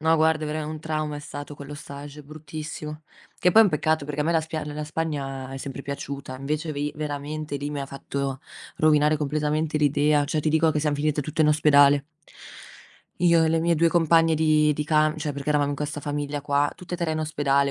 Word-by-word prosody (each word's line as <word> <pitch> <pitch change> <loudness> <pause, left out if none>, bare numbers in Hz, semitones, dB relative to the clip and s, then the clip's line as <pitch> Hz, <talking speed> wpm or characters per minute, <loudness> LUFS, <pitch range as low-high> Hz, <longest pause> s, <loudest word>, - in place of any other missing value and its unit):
No, 160 +1 +3
guarda, 155 0 +2
verame 155 0 -3
un 155 - -6
trauma 155 -1 -2
è 145 - -7
stato 145 0 -8
quello 145 +1 -9
stage 145 0 -9
bruttissimo. 150 +1 -7 0.4
Che 180 - +3
poi 225 - +8
è - - +4
un 195 - +2
peccato 155 0 +1
perché 150 0 -4
a - - +1
me 170 - +1
la 165 - +3
spia 160 0 -4
ehm, 150 0 -6
la 150 0 -4
Spagna 140 -4 -4
è - - -5
sempre 135 0 -6
piaciuta, 140 -1 -6
invece 150 +4 -3
vi 145 0 -3
veramente 150 0 -4
lì 145 +1 -4
mi 140 -2 -3
fatto 135 0 -4 0.4
rovinare 150 0 +4
completamente 150 +1 -1
l'idea, 145 0 +3
cioè, 155 +1 -1
ti 155 - 0
dico 160 +1 +3
che 150 - 0
siam 150 -1 0
finite 150 0 0
tutte 155 +2 0
in 150 - +4
ospedale. 145 -2 +5 1.2
Io 170 -2 +5
e 160 - +2
le 165 0 +2
mie 170 0 +2
2 165 +1 +3
compagne 165 -1 +4
di 155 -1 +3
di 150 +1 -2
cam 155 0 +2
cioè, 150 -1 -3
perché 140 +2 -3
eravamo 145 -1 +2
in 140 - -3
questa 150 0 -4
famiglia 145 0 -3
qua, 145 0 +1
tutte 180 0 -7
e - - -2
3 170 -2 -1
in 155 - -1
ospedale, 140 -3 +1
150 Hz, 220 wpm, -25 LUFS, 145-155 Hz, 1.2 s, poi